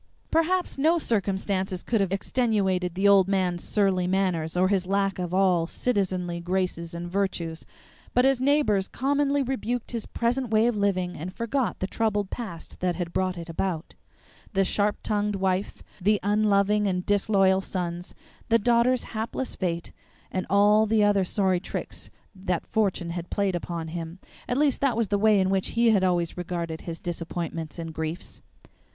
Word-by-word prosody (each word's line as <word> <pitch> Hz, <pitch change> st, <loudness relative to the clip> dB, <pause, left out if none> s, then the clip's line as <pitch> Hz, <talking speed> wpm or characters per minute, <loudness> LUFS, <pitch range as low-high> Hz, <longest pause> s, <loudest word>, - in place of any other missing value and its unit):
Perhaps 335 Hz, -1 st, +1 dB
no 320 Hz, +5 st, +4 dB
circumstances 195 Hz, -, -1 dB
could 225 Hz, -4 st, +1 dB
have 195 Hz, -2 st, 0 dB
extenuated 195 Hz, -5 st, 0 dB
the 195 Hz, +2 st, +3 dB
old 195 Hz, -2 st, +6 dB
man's 185 Hz, -3 st, 0 dB
surly 190 Hz, -4 st, +1 dB
manners 180 Hz, -4 st, 0 dB
or 185 Hz, +1 st, +4 dB
his 190 Hz, -2 st, +1 dB
lack 195 Hz, 0 st, 0 dB
of 175 Hz, -1 st, -3 dB
all 185 Hz, -3 st, +3 dB
citizenly 185 Hz, -6 st, -1 dB
graces 175 Hz, -1 st, -2 dB
and 170 Hz, +1 st, -5 dB
virtues; 175 Hz, -3 st, -2 dB, 0.5 s
but 250 Hz, -, +5 dB
his 270 Hz, -2 st, +3 dB
neighbors 260 Hz, -9 st, +2 dB
commonly 285 Hz, +1 st, +1 dB
rebuked 245 Hz, -2 st, -3 dB
his 230 Hz, -3 st, -4 dB
present 245 Hz, +1 st, -1 dB
way 220 Hz, +1 st, +3 dB
of 240 Hz, -1 st, +2 dB
living 185 Hz, -3 st, 0 dB
and 180 Hz, +5 st, -7 dB
forgot 235 Hz, +2 st, -1 dB
the -, -, -2 dB
troubled 205 Hz, -1 st, -1 dB
past 200 Hz, -9 st, -7 dB
that 180 Hz, -1 st, 0 dB
had 175 Hz, -2 st, -4 dB
brought 185 Hz, -1 st, 0 dB
it 170 Hz, 0 st, -7 dB
about: 165 Hz, 0 st, -3 dB, 0.6 s
the 195 Hz, 0 st, +3 dB
sharp 205 Hz, +2 st, +1 dB
tongued 210 Hz, -1 st, 0 dB
wife, 190 Hz, 0 st, -1 dB, 0.2 s
the 205 Hz, +2 st, +3 dB
unloving 205 Hz, 0 st, +2 dB
and 180 Hz, -1 st, -1 dB
disloyal 195 Hz, -2 st, +3 dB
sons, 175 Hz, -2 st, -4 dB, 0.3 s
the 230 Hz, -, +5 dB
daughter's 240 Hz, +3 st, +3 dB
hapless 230 Hz, +3 st, -4 dB
fate, 170 Hz, -2 st, -3 dB, 0.4 s
and 185 Hz, -, -2 dB
all 210 Hz, +2 st, +5 dB
the 215 Hz, 0 st, +3 dB
other 205 Hz, -2 st, +3 dB
sorry 185 Hz, -1 st, +1 dB
tricks 190 Hz, -, -6 dB, 0.2 s
that 185 Hz, -3 st, -3 dB
fortune 195 Hz, -6 st, 0 dB
had 170 Hz, 0 st, -5 dB
played 200 Hz, -2 st, 0 dB
upon 170 Hz, -1 st, -4 dB
him 165 Hz, +1 st, -6 dB, 0.3 s
at 245 Hz, -, 0 dB
least 285 Hz, -2 st, +2 dB
that 265 Hz, -5 st, +2 dB
was 230 Hz, -4 st, 0 dB
the 205 Hz, -, +1 dB
way 215 Hz, -1 st, +5 dB
in 190 Hz, 0 st, +2 dB
which 190 Hz, -1 st, +1 dB
he 235 Hz, -1 st, +5 dB
had 200 Hz, -3 st, +3 dB
always 175 Hz, -2 st, +1 dB
regarded 170 Hz, -2 st, -4 dB
his 165 Hz, -1 st, -6 dB
disappointments 165 Hz, -2 st, -5 dB
and 165 Hz, -1 st, -6 dB
griefs. 160 Hz, +2 st, -5 dB
195 Hz, 170 wpm, -26 LUFS, 180-215 Hz, 0.6 s, old